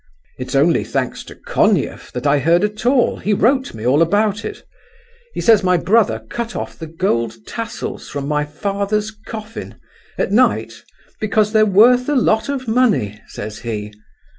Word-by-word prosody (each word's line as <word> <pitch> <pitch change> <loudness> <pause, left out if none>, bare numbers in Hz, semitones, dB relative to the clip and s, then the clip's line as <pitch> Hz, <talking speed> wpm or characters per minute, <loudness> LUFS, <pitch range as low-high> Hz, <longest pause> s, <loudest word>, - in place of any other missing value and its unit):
It's 130 +1 -4
only 150 +5 +3
thanks - - -3
to - - -11
Konief - - 0
that 125 +1 -5
I 145 0 +3
heard 170 +6 +3
at 210 +3 -2
all; 250 -1 +3
he 210 0 0
wrote 260 - +1
me 110 +1 -7
all 135 +5 +3
about 205 +5 +1
it. 430 - -7 0.7
He - - -2
says 225 -3 +5
my 180 -1 +3
brother 195 - +2
cut 235 - -5
off - - -5
the 160 - -6
gold 115 - -1
tassels 230 0 -6
from 140 -1 -4
my 150 0 0
father's 200 +7 -2
coffin, 215 0 -9 0.4
at - - -1
night 250 +5 +2 0.5
'because 215 0 +1
they're 215 -1 +5
worth 245 +6 +5
a 295 - +1
lot 220 -1 +2
of 265 -3 -3
money!' 215 - +1
says 105 0 -7
he. 105 -3 -5
205 Hz, 165 wpm, -18 LUFS, 150-225 Hz, 0.7 s, says